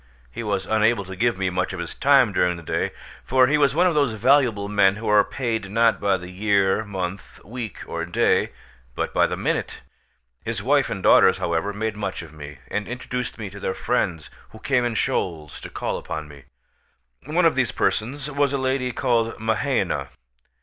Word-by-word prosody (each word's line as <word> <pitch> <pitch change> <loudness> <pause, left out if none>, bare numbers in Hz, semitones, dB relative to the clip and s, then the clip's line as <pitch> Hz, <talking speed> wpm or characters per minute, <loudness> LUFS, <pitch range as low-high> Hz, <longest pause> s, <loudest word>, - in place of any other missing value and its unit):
He 70 - -6
was 100 -4 -2
unable 110 -1 +2
to 95 +1 -8
give 115 +1 +1
me 95 -1 -1
much 90 +1 -1
of 90 - -5
his 85 - -5
time 135 -6 +4
during 90 -1 +1
the 85 - -10
day; - - -1 0.3
for 130 0 +4
he 145 +4 +2
was 140 -1 +3
one 175 +3 +4
of 180 - +3
those 140 -6 +2
valuable 115 -3 +3
men 100 -1 +3
who 110 +2 -6
are 105 -1 +5
paid, 115 -6 -3
not 115 +2 +3
by 100 -2 +2
the 90 0 -9
year, 100 +1 +2
month, 95 -2 -6
week, 115 0 -6
or 85 0 -4
day, 85 +1 +2 0.5
but - - -3
by - - +3
the - - -4
minute. - - -2 0.6
His 110 -3 -3
wife 140 +2 +2
and 100 -5 -4
daughters, - - +6
however, 85 +4 -1
made 110 +1 -3
much 95 -4 -4
of 80 -2 -13
me, 75 -2 -10
and 105 0 -3
introduced 125 0 -4
me 105 -4 -6
to 100 - -10
their 95 - -2
friends, 90 -10 -1 0.2
who 110 - -13
came 125 +2 +1
in 120 -1 -2
shoals 80 -8 -2
to - - -8
call - - -3
upon 75 -1 -6
me. 70 -2 -14 0.8
One - - +2
of - - +5
these - - +1
persons 135 +6 -1
was 140 -1 +1
a - - +1
lady 130 -1 -1
called 115 -3 0
Mahaina. 115 +4 0
110 Hz, 200 wpm, -23 LUFS, 95-125 Hz, 0.8 s, daughters